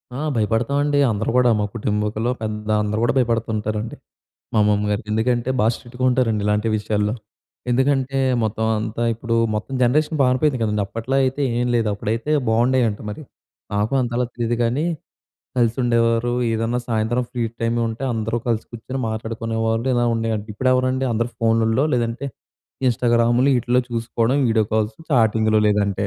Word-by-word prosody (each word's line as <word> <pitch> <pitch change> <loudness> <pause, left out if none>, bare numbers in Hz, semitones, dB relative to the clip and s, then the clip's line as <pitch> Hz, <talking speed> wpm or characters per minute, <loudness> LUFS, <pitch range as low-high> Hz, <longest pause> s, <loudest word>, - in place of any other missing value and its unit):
ఆ - - -4 0.2
భయపడతామండి. 140 +7 +1
అందరూ 105 +1 -2
కూడా 125 -1 +5
మా - - +1
కుటుంబికులో 105 +2 -1
పెద్ద 105 -1 -4
అందరూ 105 +1 -1
కూడా 120 0 +2
భయపడుతుంటారండి. 110 -2 -1 0.6
మా - - +1
అమ్మమ్మ 105 0 +2
గారికి, 105 +2 -3
ఎందుకంటే 120 +3 0
బాగా 110 +2 +4
స్ట్రిక్ట్‌గా 125 +1 -8
ఉంటారండి 115 -5 +1
ఇలాంటి 105 +2 +1
విషయాల్లో. 105 0 -1 0.6
ఎందుకంటే, 135 +1 +1 0.3
మొత్తం 110 +1 -1
అంతా 110 +2 -3
ఇప్పుడు 115 +1 -2 0.2
మొత్తం 125 +5 -4
జనరేషన్ 150 +5 +2
పారిపోయింది 130 +1 +2
కదండీ. 105 -1 0
అప్పట్లో 115 +5 -3
అయితే 130 +2 -1 0.2
ఏం 125 - 0
లేదు 115 -2 +1
అప్పుడైతే 115 +8 -2 0.2
బాగుండేయంట 120 -1 +2
మరి. 125 +9 -7 0.5
నాకు 105 +5 0
అంతలా 120 0 -1
తెలీదు 120 0 -1
కానీ, 125 +7 0 0.7
కలిసి 120 -2 +2
ఉండేవారు 115 0 +2 0.2
ఏదన్నా 115 +2 0
సాయంత్రం 115 +2 0
ఫ్రీ 125 -2 -3 0.2
టైం 115 0 +1
ఉంటే, 115 +4 -5
అందరూ 115 +1 -1
కలిసి 115 -2 0
కూర్చొని 130 +3 -5
మాట్లాడుకునేవాళ్ళు, 115 +1 -2
ఇలా 120 0 +2
ఉండేయంట. 110 -2 -2
ఇప్పుడెవరండి 130 +2 +1
అందరూ 115 +2 -1
ఫోన్లల్లో 115 +3 +2
లేదంటే, 120 +2 -1 0.6
ఇన్స్టాగ్రాములు 120 +2 +3
ఈటిలో 125 +1 +1
చూసుకోవడం 115 +2 0
వీడియో 110 -1 +2
కాల్స్, 110 0 0
చాటింగ్‌లు 110 -4 +3
లేదంటే. 100 -1 +1
115 Hz, 145 wpm, -21 LUFS, 110-125 Hz, 0.7 s, కూడా